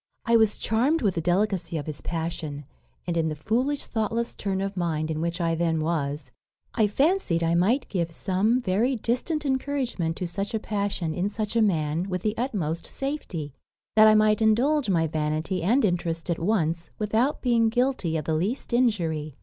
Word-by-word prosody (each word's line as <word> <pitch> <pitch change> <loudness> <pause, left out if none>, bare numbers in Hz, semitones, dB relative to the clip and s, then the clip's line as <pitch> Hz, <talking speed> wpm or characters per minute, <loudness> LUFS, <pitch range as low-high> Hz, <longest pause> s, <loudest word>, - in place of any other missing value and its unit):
I 230 - +3
was 220 -2 +4
charmed 260 +8 +1
with 200 -3 +2
the 165 - -2
delicacy 175 -1 0
of 145 - -4
his 150 -4 -5
passion; 160 -3 -4 0.4
and, 175 - -2
in 160 -1 +1
the 155 - -3
foolish 250 - 0
thoughtless 230 +1 -2
turn 195 -2 -2
of 195 0 -3
mind 160 -3 -1
in 155 0 -2
which 170 +1 -2
I 165 -1 +1
then 165 -1 0
was, 145 -4 -2 0.4
I 220 -3 +3
fancied 270 - +1
I 165 0 +2
might 205 +11 +2
give 170 -4 -2
some 195 +8 +1
very 230 +6 +1
distant 255 +7 -1
encouragement 260 -11 -1
to 180 - -3
such 200 +6 -3
a - - 0
passion 200 -6 -2
in 180 +5 -1
such 215 +1 -4
a 230 - +4
man 165 -2 +1
with 180 -1 -3
the 215 0 0
utmost 195 - -2
safety 195 - -4 0.4
that 215 0 +8
I 215 - +6
might 215 0 +3
indulge 250 +5 +3
my 165 -4 +2
vanity 155 +3 -1
and 225 +9 +3
interest 170 -2 -1
at 170 - -1
once, 170 -3 0
without 225 +6 0
being 230 -3 +3
guilty 240 -9 0
of 155 - -4
the 160 - 0
least 200 - -2
injury. 165 - 0
190 Hz, 185 wpm, -26 LUFS, 165-230 Hz, 0.4 s, that